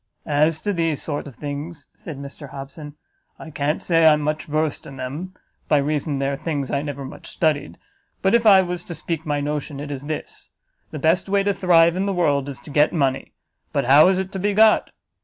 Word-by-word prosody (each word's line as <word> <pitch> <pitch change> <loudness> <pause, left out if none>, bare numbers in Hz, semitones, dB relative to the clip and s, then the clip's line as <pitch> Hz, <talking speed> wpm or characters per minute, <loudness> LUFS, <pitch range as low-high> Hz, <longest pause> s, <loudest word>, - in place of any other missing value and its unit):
"As 155 +2 +1
to 205 - -1
these 165 -4 0
sort 145 -1 -4
of 135 - -11
things," 145 +3 -6
said 155 -5 -9
Mr 140 +1 -9
Hobson, 140 +2 -9 0.4
"I 160 - -10
can't 145 +1 -1
say 165 -2 +3
I 160 -1 +8
am 150 - 0
much 150 +1 -2
versed 155 0 -2
in 135 - -10
them, 150 +9 -6 0.3
by 150 - +4
reason 145 0 -1
they 135 0 -1
are 140 - -2
things 145 -3 -3
I 140 - 0
never 140 -2 -5
much 130 - -10
studied; 145 - -1 0.5
but 190 - +3
if 235 0 +4
I 195 -2 +8
was 175 -1 -4
to 170 - -6
speak 160 0 -4
my 145 -1 0
notion, 145 0 -3
it 145 0 -6
is 140 0 -6
this; 155 0 -6 0.4
the - - -7
best 165 +6 +1
way 200 0 +2
to 200 0 +1
thrive 170 -3 +4
in 190 +2 -1
the 200 - 0
world 145 -5 +1
is 135 - -8
to 150 - -11
get 150 +2 +4
money; 135 -5 -1 0.4
but - - 0
how 145 +6 +7
is 190 0 +3
it 190 0 -3
to 190 - -4
be 205 +1 0
got? 220 +1 +5
150 Hz, 225 wpm, -22 LUFS, 145-170 Hz, 0.5 s, I